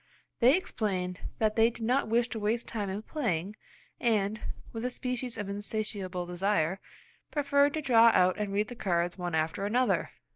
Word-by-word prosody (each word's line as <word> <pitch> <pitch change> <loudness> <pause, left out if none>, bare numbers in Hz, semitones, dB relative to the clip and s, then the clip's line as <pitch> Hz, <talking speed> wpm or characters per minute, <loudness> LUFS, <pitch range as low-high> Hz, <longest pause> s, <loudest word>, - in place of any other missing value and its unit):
They 255 +7 +6
explained 190 - -2 0.2
that 215 -1 +1
they 225 0 +5
did 235 -1 -6
not 255 +3 +2
wish 235 +2 +2
to 225 - -4
waste 220 +3 -1
time 205 -3 -3
in 200 +3 -4
playing, 210 - -2 0.4
and, 215 -2 +1 0.3
with 225 0 -4
a 250 - 0
species 250 -1 -4
of 205 - -4
insatiable 200 -3 -3
desire, 180 0 0 0.5
preferred 285 0 +2
to 310 - -2
draw 235 -4 +6
out 185 -2 +4
and 210 -1 -2
read 205 +2 0
the 245 - -7
cards 175 -4 -1
one 175 -2 -2
after 160 +4 -1
another! 245 +5 +1
215 Hz, 175 wpm, -30 LUFS, 190-240 Hz, 0.5 s, They